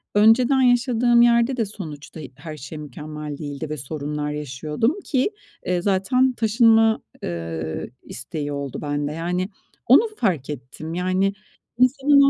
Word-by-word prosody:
önceden 240 +5 +5
yaşadığım 245 -1 +4
yerde 235 +2 +4
de 230 - +1
sonuçta 160 -7 -9 0.2
her 155 0 -8
şey 150 +3 -8
mükemmel 150 0 -7
değildi 145 0 -5
ve 155 - -3
sorunlar 150 +2 -4
yaşıyordum 150 - -2
ki, 270 - +1 0.3
eee, 180 -1 0
zaten 230 +8 +2
taşınma, 225 -1 +4 0.2
eee, 80 -2 -4
isteği 145 +4 -5
oldu 140 -2 -4
bende. 145 0 -2
Yani, 180 +4 -2 0.4
onu 280 - +6
fark 165 - 0
ettim. 150 +4 -7
Yani, 185 +2 +1 0.4
insanın 275 +3 +5
180 Hz, 125 wpm, -23 LUFS, 150-235 Hz, 0.4 s, onu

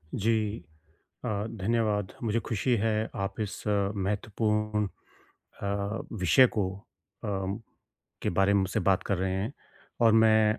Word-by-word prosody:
जी, 110 0 0 0.6
अ, - - -1 0.2
धन्यवाद। 105 -2 0
मुझे 115 0 +1
खुशी 115 +3 0
है 110 0 0
आप 95 +2 -3
इस 105 -1 -4
महत्वपूर्ण 105 +1 0 0.8
अ, 100 - -1 0.5
विषय 100 +5 +5
को 100 -3 +2 0.6
अ, - - -2 0.9
के - - +1
बारे 95 +3 +3
में 100 - +4
मुझसे 95 -1 0
बात 95 -1 +3
कर 100 - 0
रहे 95 0 0
हैं 100 +8 -2 0.5
और 115 - +7
मैं 110 -1 +5
105 Hz, 130 wpm, -29 LUFS, 100-110 Hz, 0.9 s, और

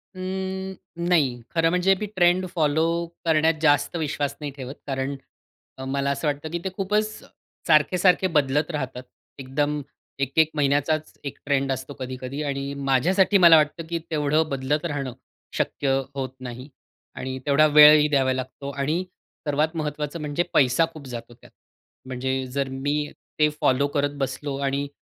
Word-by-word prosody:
अं, 190 +1 -4 0.4
नाही. 135 -8 +2
खरं 165 -1 +2
म्हणजे 180 +2 +3
मी 210 - -2
ट्रेंड 180 +1 +3
फॉलो 155 0 +2 0.4
करण्यात 160 0 +3
जास्त 145 +1 +3
विश्वास 145 -2 -2
नाही 145 -2 -5
ठेवत, 130 +1 -7
कारण 135 +1 -2 0.6
अ, 130 - -6
मला 140 +1 -1
असं 140 +3 -2
वाटतं 145 +2 -2
की 170 - -2
ते 190 - -2
खूपच 210 +2 +1 0.6
सारखे-सारखे 180 +4 +4
बदलत 145 +2 +2
राहतात. 130 -4 -4 0.4
एकदम 145 +3 -1 0.4
एक, 135 -1 -1
एक 160 -1 +5
महिन्याचाच 145 +2 +1
एक 140 - -5
ट्रेंड 135 -1 +1
असतो 130 +2 -4
कधी-कधी 130 +2 -5
आणि 140 0 -3 0.2
माझ्यासाठी 185 +9 +4
मला 165 -1 +10
वाटतं 155 +2 0
की 170 -1 -1
तेवढं 150 +1 +2
बदलत 140 +4 -1
राहणं 140 -5 -3 0.4
शक्य 135 -2 0 0.2
होत 130 -2 -2
नाही. 130 +2 -8 0.5
आणि 130 0 -4
तेवढा 145 +2 +5
वेळही 150 0 +8
द्यावा 135 -3 +2
लागतो. 130 +2 -5
आणि 150 +6 -1 0.4
सर्वात 155 +3 +1
महत्वाचं 150 +1 -3
म्हणजे 150 +3 -1
पैसा 135 +4 +4
खूप 145 -4 -10
जातो 120 -1 -8
त्यात. - - -19 0.6
म्हणजे 130 +1 -2
जर 140 -1 -1
मी 145 +3 -2 0.3
ते 150 0 +5
फॉलो 140 +2 +3
करत 145 0 0
बसलो 135 +1 -3
आणि 140 +1 -1
145 Hz, 150 wpm, -24 LUFS, 135-160 Hz, 0.6 s, मला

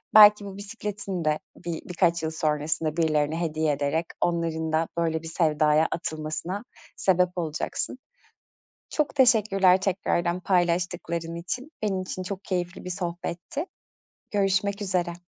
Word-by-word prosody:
belki 210 -1 +9
bu 195 0 -8
bisikletini 200 -4 -4
de 155 0 +2 0.2
bi 170 -1 -4
bir - - -5
birkaç 170 -2 +2
yıl 160 - -1
sonrasında 155 0 0
birilerine 155 0 +1
hediye 155 -2 +1
ederek 145 +4 0 0.2
onların 165 -2 0
da 160 +1 +2
böyle 160 -1 0
bir - - -6
sevdaya 155 -1 +3
atılmasına 165 +5 -3 0.3
sebep 180 -1 +3
olacaksın. 165 +9 -2 0.9
Çok 300 -2 0
teşekkürler 200 -7 +5
tekrardan 180 -2 0
paylaştıkların 175 -2 0
için. 250 - -4
Benim 195 -3 0
için 185 0 -5
çok 195 +1 -6
keyifli 180 -1 -3
bir 180 - -5
sohbetti. 175 - -4 0.7
Görüşmek 200 0 +1
üzere. 180 -3 0
175 Hz, 130 wpm, -26 LUFS, 160-195 Hz, 0.9 s, belki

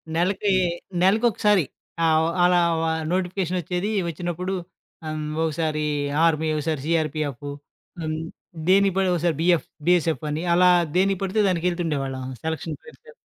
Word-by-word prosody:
నెలకి 195 +4 +1 0.5
నెలకొకసారి. 210 - +3 0.4
ఆవ్ 160 0 +3 0.2
అలా 180 0 +5 0.2
వా 165 0 +1 0.2
నోటిఫికేషనొచ్చేది 180 0 -1 0.2
వచ్చినప్పుడు 175 +3 -3 0.5
ఆహ్, 155 - -3
హ్మ్. 150 0 -4
ఒకసారి 155 -1 -1 0.4
ఆర్మీ 160 -1 +2
ఒకసారి 150 -1 -2
సీఆర్‌పీఎఫ్ 155 -4 -1 0.6
హ్మ్. 155 0 -2 0.5
దేనికి 195 0 +4
పడి 190 -1 +2
ఒకసారి 170 -2 +1
బీఎఫ్ 170 -1 +2 0.2
బీఎస్ఎఫ్ 165 -3 +2
అని 150 +2 -2
అలా 180 +1 +5 0.3
దేనికి 195 0 +2
పడితే 195 +3 +1
దానికి 175 -1 -1
వెళ్తుండేవాళ్ళం 140 -7 -2 0.2
సెలక్షన్ 160 0 -3
పేరు 465 - -14
చెప్పి. 470 - -14
170 Hz, 125 wpm, -24 LUFS, 155-185 Hz, 0.6 s, అలా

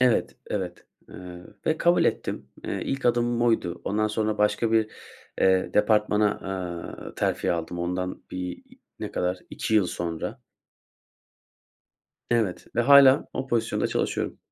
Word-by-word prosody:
Evet, 125 -3 +2
evet, 90 -4 -4 0.2
eee, - - -12 0.5
ve 160 0 +2
kabul 175 +1 +4
ettim. - - -2 0.2
Eee, - - -3
ilk 135 -2 -2
adımım 120 0 +2
oydu. 115 -7 +1
Ondan 110 +2 +1
sonra 110 0 -1
başka 110 +2 +2
bir, 110 -1 +3 0.5
eee, 95 -1 +4
bir - - -19
departmana, 105 0 +3
aaa, 90 -3 -6
terfi - - 0
aldım, 85 +1 -4
ondan 90 +1 -3
bir 90 -1 -5 0.4
ne - - -5
kadar 90 +1 -1
2 110 - -2
yıl 105 -4 +4
sonra. 85 -2 -4 1.9
Evet 110 -6 0
ve - - +4
hâlâ, 140 +2 +7
o 135 - -3
pozisyonda 120 -3 0
çalışıyorum. - - -2
105 Hz, 135 wpm, -26 LUFS, 90-120 Hz, 1.9 s, hâlâ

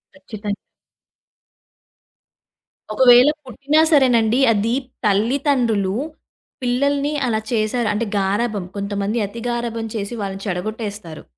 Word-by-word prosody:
ఖచ్చితం 215 -7 -7 2.4
ఒకవేళ 245 +3 +7 0.2
పుట్టినా 280 +5 +1
సరేనండి. 245 -5 +4
అది 220 +3 0 0.3
తల్లితండ్రులు 225 -2 +1 0.7
పిల్లల్ని 280 +4 0
అలా 220 -2 0
చేసారు. 225 0 0
అంటే 220 +3 -1
గారాబం 200 +1 -1
కొంతమంది 200 +2 -2
అతి 230 +4 -9
గారాబం 235 -1 -3
చేసి 200 +3 -4
వాళ్ళని 195 0 -5
చెడగొట్టేస్తారు. 200 -2 -5
225 Hz, 90 wpm, -20 LUFS, 205-245 Hz, 2.4 s, ఒకవేళ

